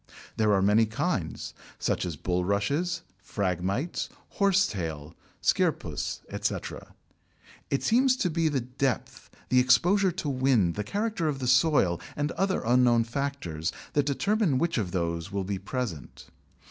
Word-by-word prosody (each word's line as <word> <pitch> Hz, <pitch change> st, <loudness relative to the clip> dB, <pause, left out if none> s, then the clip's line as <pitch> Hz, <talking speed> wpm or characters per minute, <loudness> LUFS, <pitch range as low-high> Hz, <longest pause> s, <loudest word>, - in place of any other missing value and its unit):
There 110 Hz, -2 st, +2 dB
are 95 Hz, -, +2 dB
many 105 Hz, +3 st, +4 dB
kinds, 110 Hz, -, -2 dB, 0.2 s
such -, -, -1 dB
as 85 Hz, -, -4 dB
Bulrushes, 100 Hz, -, -1 dB, 0.2 s
Phragmites, 100 Hz, -, -2 dB, 0.2 s
Horsetail, 90 Hz, -, 0 dB, 0.3 s
Scirpus, -, -, 0 dB
etc. -, -, -4 dB, 0.7 s
It 140 Hz, -, 0 dB
seems 255 Hz, +2 st, +3 dB
to 180 Hz, -9 st, 0 dB
be 165 Hz, 0 st, +1 dB
the 140 Hz, -4 st, 0 dB
depth, 125 Hz, +1 st, -3 dB, 0.2 s
the 125 Hz, -, +5 dB
exposure 175 Hz, -, +4 dB
to 180 Hz, -3 st, -4 dB
wind, 130 Hz, -10 st, +2 dB
the 105 Hz, -, -3 dB
character 205 Hz, -, -1 dB
of 145 Hz, -3 st, -1 dB
the 130 Hz, -, -4 dB
soil, 125 Hz, -, +3 dB
and 145 Hz, +2 st, -1 dB
other 190 Hz, +1 st, 0 dB
unknown 120 Hz, -1 st, +4 dB
factors, 115 Hz, -, -3 dB, 0.2 s
that 145 Hz, -1 st, +2 dB
determine 195 Hz, -, +1 dB
which 170 Hz, -2 st, 0 dB
of 100 Hz, -5 st, -2 dB
those 85 Hz, 0 st, -2 dB
will 100 Hz, -1 st, -1 dB
be 95 Hz, 0 st, -3 dB
present. 100 Hz, -, -5 dB
125 Hz, 135 wpm, -28 LUFS, 95-160 Hz, 0.7 s, the